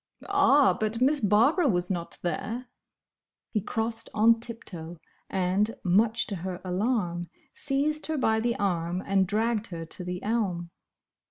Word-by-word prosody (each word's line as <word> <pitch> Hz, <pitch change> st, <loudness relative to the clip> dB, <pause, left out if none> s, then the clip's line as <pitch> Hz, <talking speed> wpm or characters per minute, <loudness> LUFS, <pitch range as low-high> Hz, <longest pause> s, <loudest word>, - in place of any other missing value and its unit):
"Ah! 290 Hz, -, +5 dB
but 215 Hz, +4 st, -2 dB
Miss 280 Hz, +4 st, +3 dB
Barbara 235 Hz, -, +4 dB
was 180 Hz, -5 st, 0 dB
not 170 Hz, -2 st, -4 dB
there!" 230 Hz, +7 st, -3 dB, 0.9 s
He 210 Hz, -, 0 dB
crossed 225 Hz, +2 st, -3 dB
on 225 Hz, +1 st, +5 dB
tip 230 Hz, 0 st, -5 dB
toe, 170 Hz, -1 st, -8 dB, 0.3 s
and, 190 Hz, +3 st, +1 dB
much 220 Hz, +6 st, +3 dB
to 200 Hz, -, -4 dB
her 180 Hz, +1 st, -5 dB
alarm, 180 Hz, -3 st, -1 dB, 0.2 s
seized 295 Hz, +2 st, -1 dB
her 315 Hz, -1 st, -1 dB
by 220 Hz, -4 st, +2 dB
the 235 Hz, +1 st, 0 dB
arm 180 Hz, -2 st, -1 dB
and 195 Hz, -1 st, +2 dB
dragged 220 Hz, +2 st, 0 dB
her 165 Hz, -3 st, -6 dB
to 170 Hz, +3 st, -5 dB
the 180 Hz, 0 st, -5 dB
elm. 190 Hz, -6 st, -1 dB
210 Hz, 150 wpm, -27 LUFS, 180-235 Hz, 0.9 s, Ah